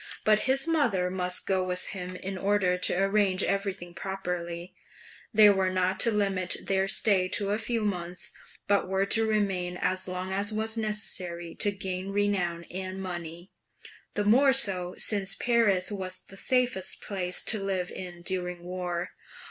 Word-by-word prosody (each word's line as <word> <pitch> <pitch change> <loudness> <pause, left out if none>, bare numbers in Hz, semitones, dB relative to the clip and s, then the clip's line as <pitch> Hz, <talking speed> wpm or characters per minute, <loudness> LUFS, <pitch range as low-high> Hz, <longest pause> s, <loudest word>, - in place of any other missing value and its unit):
But 215 0 +4
his 270 +4 +2
mother 230 - +1
must 180 -1 -1
go 190 -1 +1
with 180 0 -1
him 185 -1 -6
in 190 +1 -5
order 195 -1 +1
to 180 0 +2
arrange 195 -1 +2
everything 195 -3 -2
properly; 175 -2 -5 0.6
they 215 -1 +7
were 190 -1 +1
not 185 0 0
to 235 - +6
limit 195 -3 +1
their 195 0 +1
stay 195 -2 +3
to 200 +1 -1
a 210 - 0
few 225 -1 -1
months, 180 -3 -4 0.3
but 200 -1 +2
were 190 +1 +1
to 225 +2 +3
remain 190 -4 0
as 185 +1 -1
long 185 +1 -4
as 200 +2 0
was 220 +1 -1
necessary 185 -6 -2
to 205 - +4
gain 190 -1 -4
renown 195 -4 0
and 185 +1 -5
money; 175 -1 -7 0.6
the 205 - 0
more 265 +6 +5
so 185 -9 +3
since 195 -2 +2
Paris 220 -6 +2
was 185 -2 -6
the 195 - -10
safest 245 -3 0
place 180 -3 -1
to 215 -3 +4
live 185 -2 -2
in 175 -2 -8
during 180 -1 -3
war. 180 -1 -4
190 Hz, 160 wpm, -28 LUFS, 180-205 Hz, 0.6 s, they